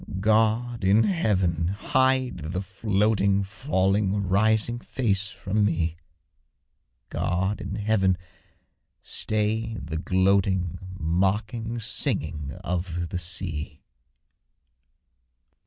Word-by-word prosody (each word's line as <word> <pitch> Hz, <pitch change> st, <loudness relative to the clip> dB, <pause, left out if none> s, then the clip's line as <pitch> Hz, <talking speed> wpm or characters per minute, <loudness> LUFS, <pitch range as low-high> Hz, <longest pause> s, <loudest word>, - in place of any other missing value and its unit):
God 110 Hz, +3 st, +2 dB
in 100 Hz, +4 st, +5 dB
heaven! 95 Hz, -, +1 dB
hide 130 Hz, +5 st, +1 dB
the 85 Hz, +5 st, -3 dB
floating, 100 Hz, 0 st, +1 dB
Falling, 100 Hz, -3 st, 0 dB
rising, 110 Hz, +5 st, +3 dB
face 105 Hz, -6 st, -1 dB
from 105 Hz, +2 st, -1 dB
me; 85 Hz, -4 st, 0 dB, 1.1 s
God 95 Hz, +4 st, -1 dB
in 100 Hz, -, -4 dB
heaven! 100 Hz, -3 st, +2 dB, 0.9 s
stay 110 Hz, +1 st, -1 dB
the 80 Hz, -6 st, -5 dB
gloating, 95 Hz, -1 st, +1 dB, 0.2 s
Mocking 100 Hz, +7 st, -1 dB
singing 75 Hz, -9 st, -1 dB
of 85 Hz, -1 st, -2 dB
the 90 Hz, -, -3 dB
sea! 85 Hz, -3 st, -3 dB
100 Hz, 85 wpm, -26 LUFS, 90-110 Hz, 1.1 s, in